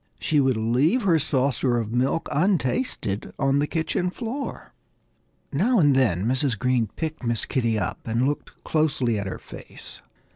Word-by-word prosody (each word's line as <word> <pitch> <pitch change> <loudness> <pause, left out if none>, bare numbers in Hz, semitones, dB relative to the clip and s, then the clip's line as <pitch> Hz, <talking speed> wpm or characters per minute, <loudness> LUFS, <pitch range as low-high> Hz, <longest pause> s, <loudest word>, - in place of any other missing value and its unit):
She 155 -3 +1
would 130 -4 +2
leave 130 - +2
her 170 -5 +4
saucer 130 -3 +1
of 115 -1 -3
milk 130 +6 0
untasted 155 - 0
on 135 0 +2
the 145 - +1
kitchen 175 +3 -1
floor. 240 +8 -6 0.8
Now 220 - +2
and 145 -7 +5
then 105 -8 +2
Mrs. 130 -1 0
Green 125 0 +1
picked 155 -3 -4
Miss 115 -2 -1
Kitty 115 -4 0
up 95 -2 -2
and 115 +4 +1
looked 145 - -5
closely 140 -8 +1
at 100 - -4
her 95 - -4
face. - - -12
135 Hz, 155 wpm, -24 LUFS, 115-160 Hz, 0.8 s, and